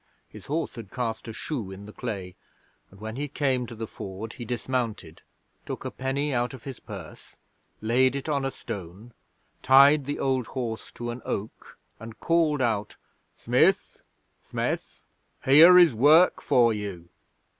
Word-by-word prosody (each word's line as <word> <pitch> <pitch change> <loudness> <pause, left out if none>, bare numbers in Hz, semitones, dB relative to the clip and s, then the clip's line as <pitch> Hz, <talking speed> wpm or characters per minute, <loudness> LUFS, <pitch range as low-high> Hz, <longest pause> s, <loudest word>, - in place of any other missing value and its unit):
His - - -13
horse 160 +3 -2
had 115 -6 -9
cast 115 -1 -4
a - - -5
shoe 110 -2 -5
in 95 +1 -9
the 105 - -11
clay, 100 -7 -6 0.5
and 100 - -18
when 110 +3 -6
he 145 +1 -2
came 130 -3 -1
to 115 - -9
the 110 +1 -5
Ford 105 +2 -8
he 120 - -8
dismounted, 115 -8 -3 0.4
took - - -7
a - - -3
penny 140 +2 -2
out 120 +1 -1
of 125 - -14
his 135 -3 -8
purse, 100 -8 -11 0.5
laid 130 +4 +2
it 140 - -4
on 145 -3 0
a 135 - 0
stone, 100 0 -9 0.5
tied 140 +2 +6
the 145 - -3
old 130 -3 0
horse 120 -4 -5
to 120 0 -5
an 120 +1 -8
oak, 105 +3 -6 0.2
and 115 0 -10
called 160 -5 +2
out: 110 -3 -1 0.4
"Smith, - - +1 0.4
Smith, - - -4 0.4
here 160 +7 +8
is 175 -6 +7
work 150 +10 +5
for 120 -2 +3
you!" 100 -5 -6
120 Hz, 160 wpm, -26 LUFS, 110-135 Hz, 0.5 s, here